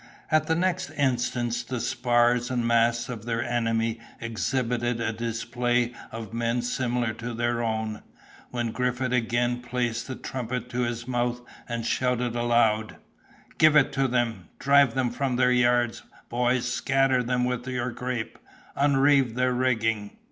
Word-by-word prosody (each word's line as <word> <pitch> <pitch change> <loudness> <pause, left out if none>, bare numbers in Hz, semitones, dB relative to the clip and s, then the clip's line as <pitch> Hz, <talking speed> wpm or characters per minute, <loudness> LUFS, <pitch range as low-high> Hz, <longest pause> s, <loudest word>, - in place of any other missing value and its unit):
At 155 0 +3
the 160 - +2
next 185 +1 0
instant 120 -3 0
the 125 -2 -2
spars 120 0 +2
and 125 -2 -1
masts 115 0 +2
of 115 -4 -7
their 115 -1 -1
enemy 115 -1 0 0.2
exhibited 120 +1 -1
a 115 -1 -1
display 120 +1 -1 0.2
of 115 -1 -7
men 115 +1 0
similar 120 -2 -1
to 120 0 -6
their 120 0 0
own, 110 -1 -2 0.5
when 120 -2 -2
Griffith 125 +1 -1
again 120 0 +1
placed 120 -1 -2
the 130 - -4
trumpet 125 -1 -4
to 125 - -3
his 120 0 -2
mouth, 120 -1 -1 0.3
and 115 -1 -3
shouted 125 -1 0
aloud— 115 -2 +2 0.6
"Give 155 -1 +6
it 145 -3 +4
to 135 -1 +2
them; 120 -6 -1
drive 140 -3 +4
them 130 -2 +1
from 130 +1 -1
their 125 0 +3
yards, 120 -1 +2 0.3
boys, 125 0 +1
scatter 135 0 +2
them 125 0 0
with 125 0 -2
your 125 -1 -2
grape—unreeve 135 +2 0
their 125 0 +2
rigging!" 115 -4 0
120 Hz, 145 wpm, -26 LUFS, 115-125 Hz, 0.6 s, Give